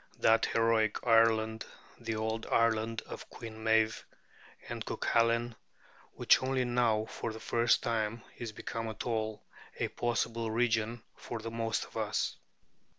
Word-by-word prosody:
that 115 0 +4
heroic 115 -2 +2
Ireland, 110 -1 +4 0.4
the 115 -2 -3
old 110 +1 -2
Ireland 115 -1 +1
of - - -9
Queen 110 -1 -9
Meave 110 -1 +2 0.6
and - - -4
Cuculain, 115 +1 +1 0.6
which - - +5
only 130 -1 0
now 120 -3 +2
for 115 - -5
the 110 - -8
first 120 +1 +2
time 115 0 -1
is 120 -2 -5
become 115 +1 -5
at 110 - -5
all 110 -2 -2 0.3
a - - -1
possible 115 -1 -1
region 115 0 0
for 120 - -6
the 115 +1 -6
most 115 -1 -1
of - - -11
us. - - -1
115 Hz, 140 wpm, -32 LUFS, 110-115 Hz, 0.6 s, which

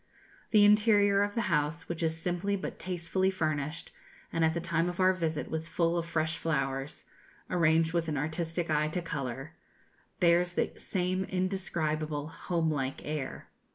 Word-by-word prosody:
The 210 -2 +6
interior 205 -1 +5
of 205 0 0
the 230 - +1
house, 160 -4 0
which 170 -1 -4
is 160 -1 0
simply 180 +4 -1
but 190 - -5
tastefully 180 +1 0
furnished, 155 -4 -2 0.4
and 165 - +1
at 160 0 +3
the - - 0
time 170 0 0
of 175 - -6
our 185 0 +5
visit 160 -4 -2
was 160 0 -2
full 170 0 +1
of 170 -1 -1
fresh 160 -1 -1
flowers, 135 -2 -2 0.5
arranged 165 -1 +3
with 170 -1 0
an 150 -2 -1
artistic 165 +3 -2
eye 150 0 +2
to 165 +3 -2
colour, 135 -2 -4 0.7
bears 175 +1 +3
the - - +1
same 185 0 -1
indescribable 160 -6 -2
homelike 160 -5 -1
air. 150 -3 -4
165 Hz, 155 wpm, -30 LUFS, 155-180 Hz, 0.7 s, The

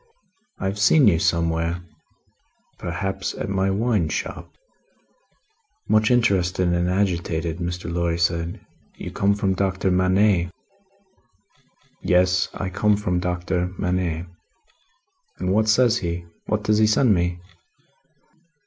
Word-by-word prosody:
"I - - -5
have 100 +2 -2
seen 130 +6 +5
you 85 -5 +4
somewhere." 85 +1 0 1.0
"Perhaps 95 +3 -3
at - - -4
my 95 0 +1
wine 100 -4 +1
shop?" - - -4 1.4
Much 110 0 +3
interested 95 -7 +2
and 85 0 +1
agitated, 85 -3 -1
Mr. 90 0 -4
Lorry 85 -1 0
said: 85 0 -1 0.4
"You - - -7
come 100 +1 +1
from 100 -2 0
Doctor 95 0 0
Manette?" 95 0 +3 1.5
"Yes. 90 0 +2
I 95 - -3
come 105 +2 +2
from 90 -4 -1
Doctor 90 +1 -2
Manette." 90 -2 -1 1.1
"And 90 +1 -1
what 110 +1 +2
says 120 +1 +4
he? 85 -1 -4 0.2
What 110 -1 -1
does 105 +1 +2
he 110 - +5
send 110 +1 +4
me?" 90 -1 -1
90 Hz, 120 wpm, -23 LUFS, 85-100 Hz, 1.5 s, seen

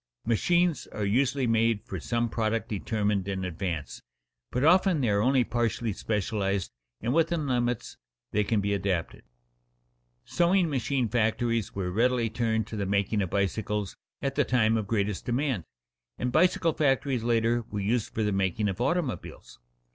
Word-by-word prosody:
Machines 170 +9 +2
are 105 - -4
usually 130 +5 +1
made 115 -2 +2
for - - -6
some 120 0 -1
product 115 0 -1
determined 105 -1 -1
in 95 -1 -2
advance, 85 -7 -4 0.5
but 125 - -1
often 180 +1 +4
they 125 -5 +1
are 100 0 +2
only 130 +2 +3
partially 115 -2 -1
specialized 100 -2 -1 0.3
and 120 +3 0
within 165 0 +1
limits 120 -3 -1 0.3
they 105 - +2
can 105 0 +1
be 100 +1 0
adapted. 95 -4 -2 1.0
Sewing 175 -1 +2
machine 130 -1 0
factories 115 0 0
were 90 -2 -2
readily 115 +2 +1
turned 110 -2 0
to 110 - -8
the 100 -2 -2
making 100 +1 +1
of 95 - -2
bicycles 100 +1 -1 0.3
at 135 -1 0
the 145 - +2
time 115 -4 +2
of 110 -3 -1
greatest 105 -2 -1
demand, 125 - 0 0.5
and 125 - -1
bicycle 165 +2 +3
factories 135 -4 +1
later 115 0 +2
were 105 - -3
used 110 +3 0
for 110 - -1
the 105 - +1
making 95 +1 0
of 95 +4 -4
automobiles. 125 - -3
115 Hz, 155 wpm, -28 LUFS, 100-125 Hz, 1.0 s, often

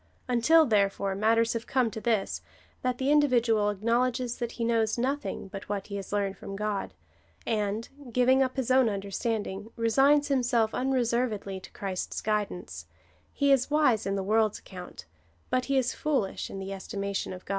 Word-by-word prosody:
Until, 255 +7 +5
therefore, 200 -4 +1
matters 225 +3 +2
have 230 0 -4
come 255 -4 +1
to 220 - -6
this, 220 -4 0 0.4
that 255 -1 -1
the 270 +3 +1
individual 240 -8 +3
acknowledges 235 +4 0
that 240 -1 -3
he 235 - -4
knows 230 -1 +1
nothing 270 -2 -2
but 195 0 -9
what 200 -2 -2
he 200 - -6
has 195 - -7
learned 200 -1 -1
from 195 - -7
God, 210 -1 -3 0.5
and, 215 0 -1 0.2
giving 255 +3 +4
up 260 -1 +1
his 260 -1 -1
own 260 -2 +5
understanding, 205 +1 -3
resigns 275 +6 +4
himself 240 -5 +1
un 260 +1 -1
reservedly 235 -6 0
to - - -12
Christ's 190 -2 -4
guidance, 210 -4 -3 0.4
he 280 -1 +2
is 270 -1 +3
wise 290 -9 +3
in 195 - 0
the 195 - -1
world's 215 +1 +2
account, 180 - -10 0.5
but 255 0 +1
he 275 -1 +1
is 255 -2 +1
foolish 265 -11 -1
in - - -7
the 195 0 -5
estimation 200 0 -4
of 185 0 -9
God. - - -19
225 Hz, 175 wpm, -28 LUFS, 200-255 Hz, 0.5 s, Until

